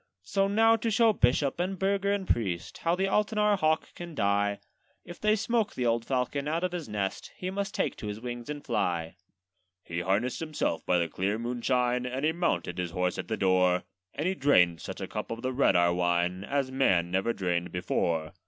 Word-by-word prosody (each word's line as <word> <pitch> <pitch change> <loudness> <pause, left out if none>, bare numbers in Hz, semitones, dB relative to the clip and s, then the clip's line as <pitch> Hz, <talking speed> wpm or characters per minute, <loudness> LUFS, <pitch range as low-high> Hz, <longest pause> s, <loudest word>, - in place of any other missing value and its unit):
'So 195 - +1
now 225 +3 +4
to 225 +1 -1
show 225 0 +4
bishop, 135 0 +2
and 185 +2 -1
burgher, 200 +1 +1
and 200 -2 -1
priest, 95 -7 -1
How 170 +1 +1
the 190 - -1
Altenahr 210 +1 +2
hawk 155 -1 +1
can 170 -2 -8
die: 100 -2 +1 0.5
If 175 - -10
they 215 0 +4
smoke 220 0 0
the 125 - -1
old 115 0 +1
falcon 135 +2 -1
out 165 +3 -1
of 180 - 0
his 175 -8 -5
nest, 100 -2 -3
He 185 0 -4
must 200 +2 -3
take - - 0
to 105 - -6
his 105 +1 -5
wings 120 +1 -6
and 145 -1 -6
fly.' 85 -8 -1 0.7
He 85 0 -4
harnessed 100 +8 0
himself 155 - -2
by 90 - +3
the 85 -1 +1
clear 95 +6 -1
moonshine, 125 +1 0
And 130 +3 -2
he 160 - +3
mounted 90 - -1
his 90 -1 -1
horse 90 0 -1
at - - -4
the 110 - -2
door; 90 -1 +3 0.3
And 150 - -1
he 190 - +1
drained 90 - +3
such - - -7
a - - -3
cup - - -5
of 115 +1 -5
the 130 0 -1
red 135 -5 +3
Ahr 85 0 +4
wine, 90 +1 0
As 135 +1 -1
man 90 -10 +2
never 95 +5 +1
drained 90 -4 -2
before. 85 -2 -1
125 Hz, 210 wpm, -29 LUFS, -, 0.7 s, now